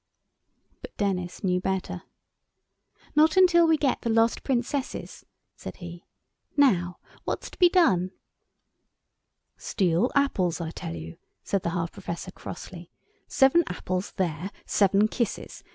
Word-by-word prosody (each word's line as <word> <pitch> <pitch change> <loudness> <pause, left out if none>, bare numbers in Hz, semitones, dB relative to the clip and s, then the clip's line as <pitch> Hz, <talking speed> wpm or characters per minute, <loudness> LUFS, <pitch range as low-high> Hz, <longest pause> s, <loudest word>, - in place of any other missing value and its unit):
But - - -11
Denis 180 -3 -2
knew 180 -1 +2
better. 190 0 -2 1.1
"Not 310 +3 +4
till 340 -1 +5
we 320 -1 +4
get 280 -3 0
the 235 - -2
lost 225 +1 +3
Princesses," 265 +1 -3 0.3
said - - -9
he, 175 -1 -10 0.5
"now, 180 -11 +3 0.3
what's - - -4
to - - -15
be 355 -2 +7
done?" 195 - +3 1.5
"Steal 185 +4 +1
apples 190 - +1
I 165 -2 -4
tell 85 - -6
you," 80 0 -8 0.3
said 195 - -1
the 170 - -1
half 170 -1 -2
Professor, 185 -2 -6
crossly; 175 -1 -9 0.4
"seven 270 +5 +4
apples—there—seven 185 +2 0
kisses. 235 -3 -3
190 Hz, 120 wpm, -26 LUFS, 175-265 Hz, 1.5 s, be